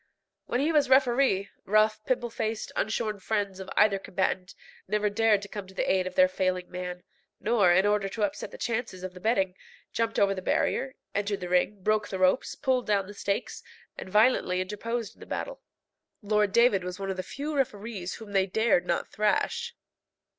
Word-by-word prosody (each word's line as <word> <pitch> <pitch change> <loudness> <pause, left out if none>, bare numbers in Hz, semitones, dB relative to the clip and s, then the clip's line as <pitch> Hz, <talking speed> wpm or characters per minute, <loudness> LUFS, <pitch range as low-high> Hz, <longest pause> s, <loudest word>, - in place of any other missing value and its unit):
When 245 - 0
he 305 +3 +2
was 295 -4 +3
referee, 255 -6 +3
rough, 215 +1 +2
pimple 240 -2 0
faced, 220 -1 -3
unshorn 215 -1 -1
friends 200 -1 -2
of 190 0 -7
either 205 -2 +4
combatant 185 -1 -2 0.3
never 210 +1 +1
dared 215 -1 +3
to - - -7
come 200 -1 -7
to 190 - -15
the - - -1
aid 185 -1 +2
of 185 - -7
their 185 - +6
failing 185 -1 -1
man, 180 0 -5 0.4
nor, 210 -5 +3
in 190 +3 +4
order 205 -1 +1
to 215 +2 -3
upset 200 -1 -2
the - - -10
chances 230 -6 -3
of 185 -1 -5
the 180 - -11
betting, 195 -3 +1 0.4
jumped 230 0 -1
over 200 -1 +4
the 190 - -5
barrier, 265 +7 0 0.2
entered 205 0 -1
the 180 - -4
ring, 185 +2 +1
broke 215 0 +1
the 190 - -4
ropes, 185 +6 +2
pulled 260 -3 0
down 200 -2 +2
the 205 - -10
stakes, 200 0 -3 0.3
and - - -8
violently 210 -3 +3
interposed 210 +3 -3
in - - -26
the - - -11
battle. - - -4 0.6
Lord 210 -1 +2
David 235 -5 +4
was 180 +1 -5
one 195 -1 -2
of 190 - -5
the - - -1
few 290 +9 -5
referees 215 -8 -2
whom 220 -2 -10
they 195 -1 +2
dared 220 -1 +2
not 170 - 0
thrash. 470 - 0
205 Hz, 195 wpm, -28 LUFS, 190-225 Hz, 0.6 s, their